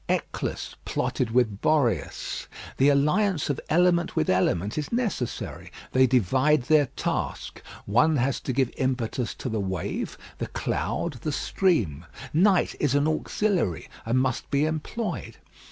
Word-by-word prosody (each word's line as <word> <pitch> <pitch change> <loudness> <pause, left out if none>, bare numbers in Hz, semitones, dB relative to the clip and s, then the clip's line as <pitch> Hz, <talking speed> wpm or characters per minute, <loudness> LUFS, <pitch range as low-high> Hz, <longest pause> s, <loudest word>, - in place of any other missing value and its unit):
Eolus - - -2
plotted 125 - -1
with 110 -4 +1
Boreas. 120 - 0 0.3
The 135 +2 +5
alliance 150 +4 +2
of 140 - -4
element 170 +1 +3
with 75 - +2
element 95 +2 +1
is 150 -1 -3
necessary; 230 - -3 0.2
they 130 0 +5
divide 130 +5 +3
their 150 +1 +4
task. - - -3 0.2
One 135 +10 +3
has 135 0 +1
to - - -3
give 130 -1 +1
impetus 125 -2 -1
to - - -6
the 110 -3 -1
wave, 95 -3 -3 0.2
the - - -2
cloud, 150 -8 -2
the 155 - -2
stream: 115 - 0 0.3
night 185 +3 +4
is 140 -2 +1
an 145 +1 +3
auxiliary, 160 - 0
and 115 +3 0
must 130 -1 -1
be 140 +2 +2
employed. 160 +9 -3
135 Hz, 135 wpm, -26 LUFS, 115-155 Hz, 0.3 s, The